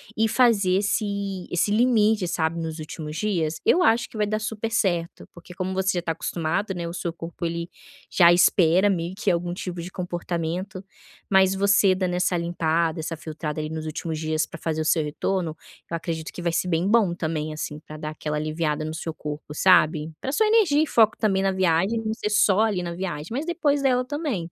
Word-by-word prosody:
e 225 +1 +2
fazer 220 -7 +3
esse 200 -2 -2
esse 175 +4 +1
limite, 220 -4 +3
sabe, 165 0 -1
nos 160 0 -4
últimos 155 0 -7
dias. 170 -7 -1
Eu 360 - +4
acho 230 +2 +3
que - - -17
vai 210 -1 0
dar 215 0 0
super 220 +1 -3
certo, 175 -7 -1
porque, 175 0 -13
como 185 0 -3
você 190 -1 0
já 175 - -2
tá 165 - -1
acostumado, 170 +5 -2
né, 170 -1 -4
o 170 - -6
seu 170 -1 -3
corpo 170 +1 -5
ele 170 0 -4 0.4
já 170 -2 +6
espera 180 +2 +4
meio 175 0 -3
que 205 -2 +1
algum 175 +1 -2
tipo 180 -2 -5
de 175 - -7
comportamento. 180 +2 -4 0.4
Mas 190 -1 +4
você 195 -1 +4
dando 185 -1 -1
essa 180 0 +1
limpada, 170 -1 0
essa 165 0 -4
filtrada 155 -1 -5
ali 155 - -3
nos 160 0 -5
últimos 155 +1 -4
dias 155 0 0
pra 165 - -11
fazer 160 -1 -1
o - - -2
seu 160 0 +2
retorno, 160 +2 -2 0.3
eu 170 - -2
acredito 160 -1 -5
que 175 - -8
vai 170 - +1
ser 180 - 0
bem 170 +2 0
bom 205 -6 +3
também, 155 -2 -3
assim, 150 -1 -5
pra 155 - -8
dar 155 0 -5
aquela 150 0 -4
aliviada 155 0 -2
no 155 - -4
seu 160 0 -5
corpo, 150 0 -7
sabe. 160 -4 +4
Pra 270 - -3
sua 435 +9 +2
energia 380 -10 +4
e - - +1
foco 220 -1 +4
também, 195 -3 +1
na 195 0 +2
viagem 190 +5 +1
não 220 - 0
ser 210 -2 -3
só 210 -1 +3
ali 205 -5 +1
na 170 -1 -4
viagem, 170 -4 -5
mas 280 +7 -3
depois 295 -5 +1
dela 255 -2 +2
também. 290 - -2
175 Hz, 210 wpm, -24 LUFS, 160-205 Hz, 0.4 s, já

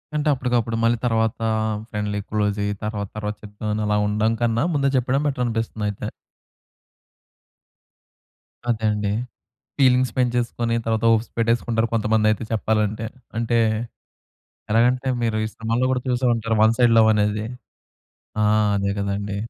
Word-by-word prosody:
అంటే, 150 0 0
అప్పటికప్పుడు, 120 -3 0
మళ్ళీ 115 +1 +3
తరువాత 115 0 +1 0.5
ఫ్రెండ్లీ‌ 105 -2 -2
క్లోజ్ 105 -1 0
అయ్యి 105 0 -1
తరువాత, 105 -2 -3
తరువాత 105 0 -3
చెప్దాం 105 +1 -6
అని 105 - -1
అలా 105 - +2
ఉండడం 110 +2 +1
కన్నా. 115 +1 +1
ముందే 140 -1 +2
చెప్పడం 130 +3 +1
బెటర్ 130 -3 -1
అనిపిస్తుంది 115 -2 -2
అయితే. 100 - -5 2.6
అదే 110 -2 0
అండి. 105 -1 -1 0.7
ఫీలింగ్స్ 130 -2 +4
పెంచేసుకొని, 120 -1 0
తర్వాత 110 0 0
హోప్స్ 115 +1 +1
పెట్టేసుకుంటారు, 115 0 +1
కొంతమంది 110 -1 +2
అయితే 110 - -2
చెప్పాలంటే. 110 0 0 0.3
అంటే 115 0 +1 1.1
ఎలాగంటే, 125 +4 +3 0.2
మీరు 110 -1 0
ఈ - - -1
సినిమాల్లో 115 +3 0
కూడా 130 -1 0
చూసే 125 +1 0
ఉంటారు, 115 0 -1
వన్ 110 +1 +5
సైడ్ 120 -2 +4
లవ్ 110 - +6
అనేది. 105 0 0 1.0
ఆ! - - +4 0.3
అదే 100 0 0
కదండీ! 100 0 -2
115 Hz, 135 wpm, -22 LUFS, 105-120 Hz, 2.6 s, లవ్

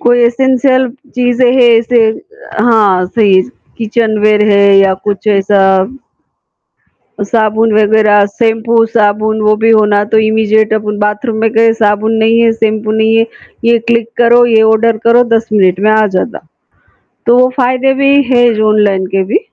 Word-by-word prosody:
कोई 245 0 +1
एसेंशियल 260 +1 0 0.3
चीज़ें 245 0 0
हैं 245 -2 +3
इसे 235 +1 0 0.6
हाँ 205 -6 +1
सही, 195 -2 +1 0.4
किचनवेयर 215 -2 0
है 200 -1 +3
या 195 -1 +2
कुछ 205 +1 -4
ऐसा। 195 -1 +1 1.6
साबुन 220 +1 -1
वग़ैरह, 210 -1 +2
शैम्पू, 225 +1 -1
साबुन 215 0 0
वो 215 0 +2
भी 225 +1 0
हो 215 -1 +3
ना, 205 0 0
तो 220 +1 0
इमीडिएट 220 0 0
अपुन 210 -1 -4
बाथरूम 210 +2 -3
में 225 0 0
गए 225 0 +2
साबुन 215 0 -1
नहीं 225 +1 +2
है, 230 -1 +2
शैम्पू 220 -1 -3
नहीं 220 0 0
है, 225 0 +1 0.4
ये 235 0 +2
क्लिक 230 -1 0
करो, 240 0 +3
ये 225 -2 +2
ऑर्डर 225 +1 0
करो, 235 +1 +4
10 225 0 -4
मिनट 190 -2 +1
में 215 - +1
आ 215 0 +2
जाता। 230 - -4 0.9
तो 240 +1 +3
वो 255 0 +3
फ़ायदे 255 +1 0
भी 275 0 +2
हैं 245 -2 +2 0.2
ऑनलाइन 200 -3 0
के 195 - +1
भी। 215 - -1
220 Hz, 155 wpm, -10 LUFS, 210-235 Hz, 1.6 s, करो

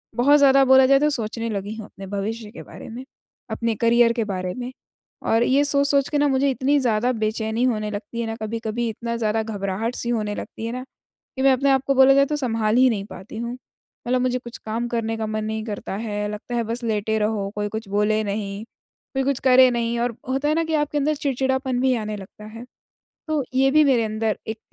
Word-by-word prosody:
बहुत 275 +5 +5
ज़्यादा 275 -1 +6
बोला 265 0 +7
जाए 275 +1 +5
तो 300 +1 +3
सोचने 230 -4 -3
लगी 205 0 -4
हूँ 220 -2 -7
अपने 195 0 -11
भविष्य 210 +2 -4
के 245 - -10
बारे - - -11
में, 240 +3 -7 0.5
अपने 230 -1 -1
करियर 235 +1 +4
के 230 -1 -1
बारे 185 -3 -3
में 250 0 -5 0.6
और 225 +1 +4
ये 270 +4 +3
सोच-सोच 280 -1 +2
के 295 - 0
ना 290 - +3
मुझे 275 0 +2
इतनी 275 +3 +1
ज़्यादा 240 -1 +1
बेचैनी 220 +1 -1
होने 215 -4 0
लगती 235 +4 -6
है 230 - -3
ना 225 - -3
कभी-कभी 225 +1 -3
इतना 235 +2 -4
ज़्यादा 220 -1 0
घबराहट-सी 215 +3 -3
होने 215 -3 -1
लगती 225 - -7
है 230 - -3
ना 255 0 -5 0.5
कि 265 - -3
मैं 270 0 +5
अपने 275 +2 +1
आप 265 -1 +3
को 275 - +3
बोला 265 +1 +7
जाए 275 0 +5
तो 300 +2 -2
सँभाल 225 -5 0
ही 255 0 +6
नहीं 205 -4 -2
पाती 190 +2 -10
हूँ। 235 +1 -4
मतलब 250 0 -5
मुझे 255 0 0
कुछ 240 -1 -9
काम 225 +2 -3
करने 225 -1 -2
का 220 - -2
मन 215 0 -2
नहीं 220 0 -3
करता 205 -3 -5
है, 210 -1 -3
लगता 210 +3 -6
है 235 - +1
बस 230 +2 -4
लेटे 220 -1 0
रहो, 210 -2 -1
कोई 205 0 -1
कुछ 220 0 -5
बोले 210 +2 +1
नहीं, 200 0 -4 0.5
कोई 270 - +1
कुछ 275 -1 0
करे 255 0 +7
नहीं 235 0 -1
और 240 -1 -1
होता 270 +3 0
है - - +3
ना 330 - +1
कि 320 0 -3
आपके 295 0 0
अंदर 300 +2 +1
चिड़चिड़ापन 265 -2 -1
भी 260 0 +3
आने 215 -2 -3
लगता 200 +2 -12
है, 225 +3 -10 0.6
तो 310 -3 0
ये 270 +1 +4
भी 305 +2 +5
मेरे 260 -5 +3
अंदर 215 0 -1
एक 220 0 -4
235 Hz, 225 wpm, -23 LUFS, 215-265 Hz, 0.6 s, बोला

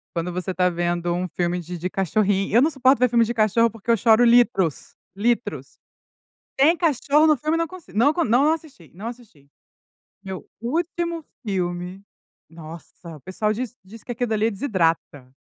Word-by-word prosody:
quando 170 +1 -2
você 180 +1 -3
tá 180 0 +2
vendo 175 0 -1
um 180 +1 -2
filme 175 +1 -2
de 175 +1 -7
de 180 +2 -3
cachorrin 195 +2 0
eu 235 - +5
não 300 - +4
suporto 270 -3 +3
ver 250 0 +3
filme 235 0 +3
de 235 - -3
cachorro, 230 +1 +3
porque 225 +1 -12
eu 230 - +4
choro 225 +2 +4
litros, 235 - +2 0.2
litros. 205 - -2 0.8
Tem 295 +6 +5
cachorro 300 -2 +2
no 305 -2 +4
filme 305 +5 -1
eu - - 0
não 330 - 0
consi 370 -1 -13
não 255 +8 +3
co 340 - 0
não 265 +6 +3
assisti, 285 - -10
não 200 +6 -8
assisti. 230 - -11 0.8
Meu 190 -2 -7
último 335 +5 -3 0.2
filme, 180 -1 -3 0.5
nossa, 165 0 -11
o 150 - -15
pessoal 210 +6 -2
diz 240 +2 -5
diz 215 +3 -13
que 245 - -5
aquilo 240 -1 -2
ali 220 +2 +1
desidrata. 165 - -2
215 Hz, 180 wpm, -22 LUFS, 180-250 Hz, 0.8 s, eu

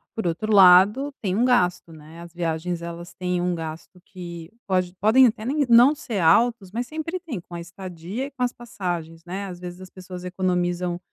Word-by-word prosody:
Por 220 - -3
outro 175 +6 -1
lado, 200 +9 +6
tem 190 -3 -1
um 240 +3 +2
gasto, 180 -9 +1
né, 160 +2 -13
as 170 0 -12
viagens, 170 0 -3
elas 170 +1 -8
têm 180 -2 -2
um 180 0 0
gasto 165 +2 -7
que 170 -2 -9 0.2
pode 185 -2 0
podem 240 +5 +6
até 215 0 -3
nem 285 +1 0
não 240 +5 +7
ser 275 -8 -5
altos, 195 +4 +3
mas 240 +3 -3
sempre 320 +3 -4
têm 295 - -6
com 175 - -15
a 170 - -5
estadia 180 +6 -6
e 285 - -9
com 255 -1 -11
as 245 -1 +2
passagens, 175 -8 -6
né. 190 +3 -5
Às 180 -2 -8
vezes 180 0 -8
as 185 - -10
pessoas 180 -1 -9
economizam, 180 -1 -1
180 Hz, 200 wpm, -24 LUFS, 175-230 Hz, 0.2 s, não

